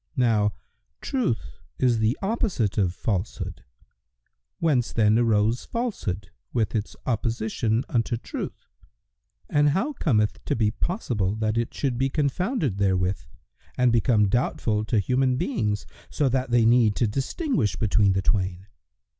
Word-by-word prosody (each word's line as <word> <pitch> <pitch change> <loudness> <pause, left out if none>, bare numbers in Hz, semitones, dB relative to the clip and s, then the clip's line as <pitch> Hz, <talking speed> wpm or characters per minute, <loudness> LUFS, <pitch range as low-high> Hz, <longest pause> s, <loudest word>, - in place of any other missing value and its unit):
Now 110 -5 +3 0.5
Truth 195 - -2 0.2
is 120 -3 +2
the 110 +4 +1
opposite 195 - 0
of 95 -3 +2
Falsehood; 100 +1 -3 0.9
whence 140 -8 +1
then 110 0 +3
arose 115 0 +2
Falsehood 100 - -3 0.2
with 110 -4 0
its 110 -1 -2
opposition 115 -1 0
unto 120 0 0
Truth, - - -6 0.8
and 145 0 +3
how 195 - 0
cometh 105 - +1
it - - -24
to - - +1
be 110 -2 +2
possible 110 - -1
that 110 0 -1
it 115 0 -1
should 130 -4 -1
be 135 +1 +2
confounded 150 - -1
therewith 95 -1 +1 0.6
and 125 -1 +4
become 115 -2 +3
doubtful 110 -1 0
to 115 - 0
human 125 +4 +2
beings, 105 -5 -1 0.2
so 145 - +1
that 130 0 -1
they 120 -1 +4
need 115 -3 +4
to 120 - +2
distinguish 135 - -1
between 100 -1 +2
the 95 0 0
twain? 95 -2 0
115 Hz, 140 wpm, -25 LUFS, 105-130 Hz, 0.9 s, and